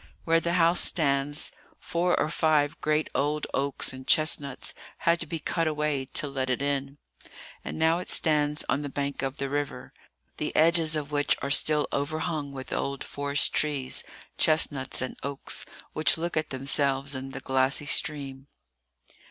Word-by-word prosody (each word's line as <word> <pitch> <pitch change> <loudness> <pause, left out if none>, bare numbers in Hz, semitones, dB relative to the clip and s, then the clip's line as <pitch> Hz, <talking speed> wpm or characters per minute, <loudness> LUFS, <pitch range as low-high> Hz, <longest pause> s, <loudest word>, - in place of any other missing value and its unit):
Where 165 0 +3
the 170 +1 -1
house 170 0 +4
stands, 145 -1 +2 0.3
four 175 +1 0
or - - +2
five 155 -3 +2
great 155 0 +1
old 150 +1 0
oaks 140 -1 -1
and 130 0 -10
chestnuts 145 -3 +1 0.2
had 170 0 +2
to - - -2
be 165 - -3
cut 165 +1 -1
away 150 -3 0
to 145 +3 -3
let 135 -2 -2
it 125 - +1
in; 140 0 -2 0.7
and - - -5
now 160 +2 +3
it 180 - -5
stands 150 -2 +1
on 140 - +1
the 145 - -4
bank 140 0 -3
of 135 0 -3
the 140 - -2
river, 145 +1 -3 0.4
the - - -3
edges 160 0 +3
of 150 -1 -3
which 145 -1 +2
are 140 - -1
still 150 0 +3
overhung 150 0 -2
with 130 -1 -7
old 140 0 -2
forest 140 0 +1
trees, 145 -4 0 0.4
chestnuts 145 -5 +2
and 130 - -5
oaks, 140 0 -4 0.3
which 155 +2 +2
look 170 +2 -3
at 155 -1 0
themselves 135 +1 +1
in 135 0 -5
the - - -6
glassy 130 +2 +2
stream. 140 -2 0
145 Hz, 165 wpm, -27 LUFS, 140-155 Hz, 0.7 s, house